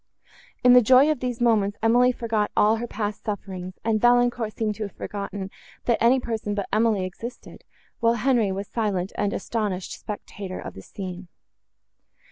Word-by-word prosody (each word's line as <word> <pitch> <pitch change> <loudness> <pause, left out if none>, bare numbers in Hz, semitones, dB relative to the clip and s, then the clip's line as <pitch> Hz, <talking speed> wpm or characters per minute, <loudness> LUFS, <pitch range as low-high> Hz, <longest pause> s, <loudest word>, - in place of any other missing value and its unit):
In 250 0 +7
the 250 - +8
joy 260 +6 +6
of 305 - -2
these 250 -1 -3
moments, 215 -4 +2
Emily 245 +2 +5
forgot 225 -4 -1
all 215 +2 +4
her 240 +2 -4
past 210 -2 -4
sufferings, 185 -3 -5
and 220 -2 +1
Valancourt 245 -2 +3
seemed 215 -2 0
to 220 - -3
have - - -15
forgotten, 200 -1 -5 0.3
that 235 - +1
any 250 +3 +5
person 220 -4 -3
but 200 -2 -2
Emily 215 -3 +2
existed; 230 +7 -9 0.4
while 230 0 +3
Henri 235 -3 +2
was 195 +1 -4
a - - -37
silent 200 -5 -1
and 205 - 0
astonished 200 -4 -3
spectator 200 -2 -7
of - - -7
the 95 - -10
scene. 185 - -7
215 Hz, 170 wpm, -24 LUFS, 200-235 Hz, 0.4 s, the